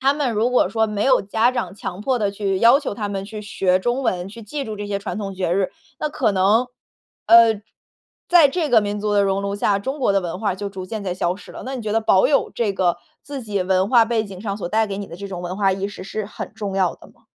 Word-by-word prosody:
他 270 +2 +3
们 285 -5 -1
如 225 +3 +1
果 250 - +3
说 220 -1 +1
没 210 -1 -2
有 260 -1 +4
家 220 +4 +2
长 250 -5 -3
强 190 -2 -6
迫 255 +3 0
地 205 -3 0
去 195 -1 -1
要 240 +5 +6
求 285 - -4
他 205 -1 -3
们 195 -1 -3
去 215 0 -7
学 185 -3 +1
中 240 +7 -1
文， 185 -7 -1
去 225 +4 -11
记 275 +7 -5
住 215 -3 -5
这 205 0 -5
些 200 -1 -2
传 200 -1 -5
统 195 -2 -5
节 185 -2 -1
日。 190 +1 +1 0.3
那 305 - -1
可 240 -8 +1
能， 205 +6 +3 0.6
呃， 230 -2 +7 0.7
在 340 -5 +7
这 320 +2 -1
个 230 -2 +6
民 205 0 -2
族 210 0 -1
的 205 - +4
熔 195 0 0
炉 200 0 -2
下， 205 0 +1
中 265 +9 -4
国 255 - +2
的 195 - +2
文 170 -2 -4
化 215 - +1
儿 - - -7
就 200 +1 -4
逐 190 -2 -7
渐 215 +1 -5
在 185 - -1
消 180 -1 0
失 - - -13
了。 - - -8
那 265 +1 -4
你 245 - -6
觉 215 -1 -2
得 225 - +2
保 215 -4 +4
有 285 - +2
这 225 -4 0
个 180 -2 +1 0.2
自 280 -1 -6
己 205 -4 -1
文 190 +1 +1
化 235 -1 +6
背 225 -1 0
景 190 -2 -9
上 200 -1 -3
所 190 -4 -5
带 220 +3 +2
给 195 -1 -5
你 200 - -5
的 170 - -10
这 200 +2 -7
种 185 -2 -6
文 180 +1 -4
化 195 -1 +2
意 195 +1 -2
识 205 - -9
是 205 +1 -4
很 210 - -7
重 205 -3 -4
要 185 -3 +2
的 - - -16
吗？ - - -26
205 Hz, 305 characters per minute, -21 LUFS, 195-230 Hz, 0.7 s, 呃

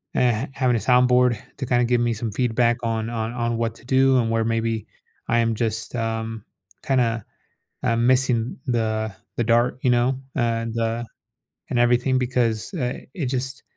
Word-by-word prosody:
eh 120 0 +2
having 130 -3 +1
a - - +1
sound 125 +4 +4
board 125 -2 +4 0.2
to 135 - -3
kinda 120 -1 +2
give 120 0 +2
me 120 -1 +1
some 110 0 -4
feedback 120 +1 +1
on 115 0 -1
on 115 -1 -3
on 120 -1 -1
what 115 -1 -1
to - - -17
do 130 0 +4
and 115 -2 +1
where 115 0 +1
maybe 115 -1 -1 0.4
I 120 - +2
am 115 -1 +1
just, 110 0 -2
um, 115 -1 -3 0.4
kinda, 120 -5 +1 0.6
I'm 115 -1 +1
missing 125 -2 +2
the 110 -3 -1 0.2
the 120 - +1
dart, 120 +2 +2
you 125 - +3
know, 125 +2 +2 0.2
and, 115 -2 -1
uh, 115 +1 -1 0.7
and 120 - 0
everything 120 +2 +3
because, 120 - 0
uh, 125 -6 -2
it 155 - -3
just 130 +2 -3
120 Hz, 175 wpm, -23 LUFS, 115-125 Hz, 0.7 s, sound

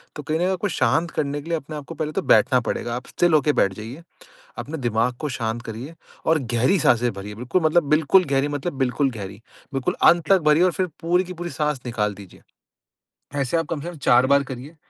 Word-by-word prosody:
तो 150 - -7
कहीं 155 +2 -1
न - - -4
कहीं 180 - +1
आपको 190 +2 -1
शांत 160 +3 +1
करने 145 0 -2
के 165 - -11
लिए 165 - +1
अपने 155 0 -8
आपको 150 +2 -8
पहले 155 0 -3
तो 195 - -2
बैठना 130 -7 +4
पड़ेगा। 120 0 -3
आप 125 - -7
स्टिल 175 -2 +1
होकर 150 -1 +4
बैठ 100 -7 +2
जाइए, 115 - -9 0.6
अपने 160 +2 -5
दिमाग 120 -1 0
को 155 - -2
शांत 120 -2 -3
करिए 120 +8 -8 0.3
और 160 0 +4
गहरी 125 +12 +3
साँसें 120 -6 +2
भरिए, 100 +1 -8
बिल्कुल 125 - -1
मतलब 160 +1 +3
बिल्कुल 160 +5 +4
गहरी 140 0 0
मतलब 145 +4 -3
बिल्कुल 135 +1 +1
गहरी, 100 -3 -8 0.3
बिल्कुल 135 -2 -1
अंत 170 -3 +5
तक 195 -1 +5
भरिए 150 +2 +4
और 185 -1 +3
फिर 185 - -1
पूरी 180 +2 +1
की 185 - -7
पूरी 175 0 -6
साँस 150 -4 -2
निकाल 105 -4 -1
दीजिए। 100 -2 -14 1.0
ऐसे 135 +5 0
आप 165 - 0
कम 150 - -2
से 170 - -7
कम 175 - -10
4 125 -2 +4
बार 140 +1 +4
करिए। 135 +4 -9
145 Hz, 225 wpm, -23 LUFS, 120-165 Hz, 1.0 s, अंत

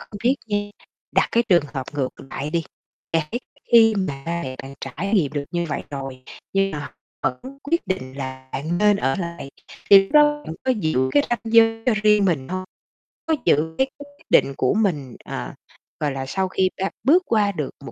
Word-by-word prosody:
không 205 - -10
biết 260 +3 +4
nha, 205 -1 0 0.5
đặt - - +3
cái 235 - +4
trường 175 -5 +5
hợp 135 - -2
ngược 135 -3 -1 0.2
lại 145 +2 -4
đi, 165 0 0 0.5
là 165 -2 +1
cái 240 - -2 0.3
khi 225 -1 +7
mà 140 -8 -3
ba 170 0 -2
mẹ 130 -3 -5
bạn 135 +1 -9
trải 165 - -4
nghiệm 155 -8 +2
được 145 -1 -2
như 170 -1 -1
vậy 140 -2 -2
rồi 135 -2 -6 0.3
nhưng 195 0 +2
mà 150 - -4
họ 140 - -7 0.3
vẫn 260 - -3
quyết 335 -2 -1
định 140 -9 -3
là 130 -1 -6
bạn 155 +6 -2
nên 210 0 +4
ở 135 -8 0
lại 170 -5 -5 0.4
thì 200 -1 +11
lúc 195 - -10
đó 295 0 +5
bạn 160 - -5
có 260 - +2
giữ 155 - 0
cái 145 - +5
ranh 240 -2 0
giới 225 0 +5
cho 245 - +5
riêng 210 -1 +5
mình 155 -8 0
hông? 185 +1 -3 0.6
Có 320 -1 +2
giữ 160 +2 +2
cái 265 - +3
quyết 285 0 -15
định 140 - +4
của 130 - +2
mình, 150 - 0
à, - - -6 0.4
gọi 150 -2 0
là, 135 -1 -4
sau 190 +8 -1
khi 185 0 +1
ta 195 +1 -1
bước 325 +9 +5
qua 210 -3 +2
được 150 -8 -3 0.2
một - - -7
175 Hz, 215 wpm, -22 LUFS, 140-215 Hz, 0.6 s, thì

